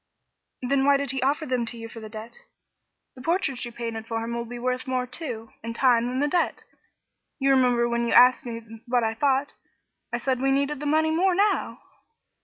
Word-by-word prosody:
"Then 270 +2 +2
why 280 0 +5
did 280 -1 -2
he 270 - -3
offer 285 +4 +1
them 255 -3 0
to 235 - -4
you 225 0 -7
for 225 0 -10
the 215 -1 -9
debt? 220 +2 -8 0.8
The 255 - -11
portrait 300 -4 0
you 240 - -5
painted 230 -1 -5
for 225 -1 -2
him 235 +1 -4
will 235 0 -3
be 245 +1 -7
worth 255 +1 -2
more, 255 -1 0
too, 250 -4 -6
in 230 0 -5
time, 240 -2 +3
than 255 +1 -2
the 290 - +2
debt. 350 +4 0 0.7
You 275 -1 +2
remember 250 -3 +3
when 235 0 0
you - - 0
asked 250 +1 +7
me 230 -2 -6 0.3
what 245 -1 +2
I 225 0 0
thought, 275 +3 +1 0.6
I 240 - 0
said 255 +1 -1
we 270 - +2
needed 280 +1 +1
the 295 - -3
money 315 +1 +3
more 360 +3 +2
now." 405 +2 +1
255 Hz, 210 wpm, -25 LUFS, 235-280 Hz, 0.8 s, asked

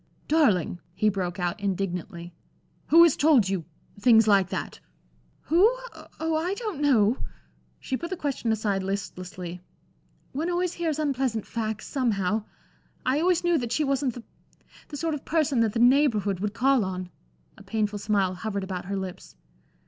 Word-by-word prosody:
"Darling," 210 - +2 0.2
he 215 - +2
broke 185 -2 -3
out, 175 +4 -2
indignantly, 180 -3 -3 0.5
"who 335 +2 +8
has 335 -4 +5
told 285 -9 +4
you 190 -4 -2 0.3
things 225 -1 +5
like 195 -3 +4
that?" - - -5 0.6
"Who? 335 +4 +2 0.6
Oh! 320 0 0
I 355 +5 -1
don't 420 - -5
know." 245 -5 +4 0.6
She 265 - -3
put 340 +6 -5
the 375 - -4
question 275 -6 -2
aside 210 -3 0
listlessly. 185 -2 -5 0.7
"One 315 +6 -2
always 355 0 0
hears 325 -3 -2
unpleasant 265 -7 -1
facts, 220 -2 -4
somehow. 215 -5 0 0.6
I 260 +3 +2
always 350 +1 +2
knew 345 -2 +3
that 240 -2 -4
she 305 - +1
wasn't 275 -3 0
the 245 - -8 0.6
the 290 - -7
sort 325 +1 -1
of 290 - -5
person 305 -5 +1
that 225 -2 +2
the 230 - -1 0.2
Neighborhood 210 -10 +1
would 210 +2 -3
call 265 -2 +3
on" 185 -1 -5 0.4
a - - -15
painful 210 -2 -2
smile 200 -3 +1
hovered 200 +1 -4
about 185 -2 -5
her 200 +1 -3
lips. 190 - -7
225 Hz, 160 wpm, -26 LUFS, 195-295 Hz, 0.7 s, who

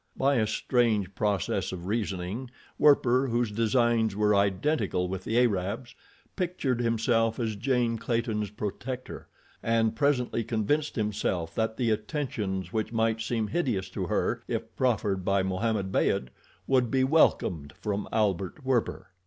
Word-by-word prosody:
By 140 0 +3
a 110 -2 +2
strange 110 -4 +1
process 100 -3 -1
of 90 -2 -6
reasoning, 105 +2 -3 0.3
Werper, 135 -3 +4
whose 120 -2 0
designs 115 -1 +2
were 105 0 +3
identical 100 0 +1
with 95 0 -4
the 115 - 0
Arab's, 115 +1 0 0.4
pictured 170 - -1
himself 115 0 +1
as 110 -3 -1
Jane 120 0 0
Clayton's 115 -3 -1
protector, 120 +5 -6 0.3
and 115 -1 +1
presently 125 -4 +1
convinced 125 +8 0
himself 100 -6 -1
that 110 +2 -1
the 120 -3 +1
attentions 105 - -3
which 110 -1 -1
might 115 -1 +1
seem 110 0 -1
hideous 120 - -1
to 95 -1 -4
her - - 0
if - - -4
proffered 105 -7 0
by 100 0 +2
Mohammed 95 +1 -1
Beyd, 65 -8 +1 0.4
would 130 -3 +2
be 130 +1 +2
welcomed 90 - +2
from 105 -1 -3
Albert 100 - -1
Werper. 130 -3 -1
110 Hz, 135 wpm, -28 LUFS, 100-125 Hz, 0.4 s, Werper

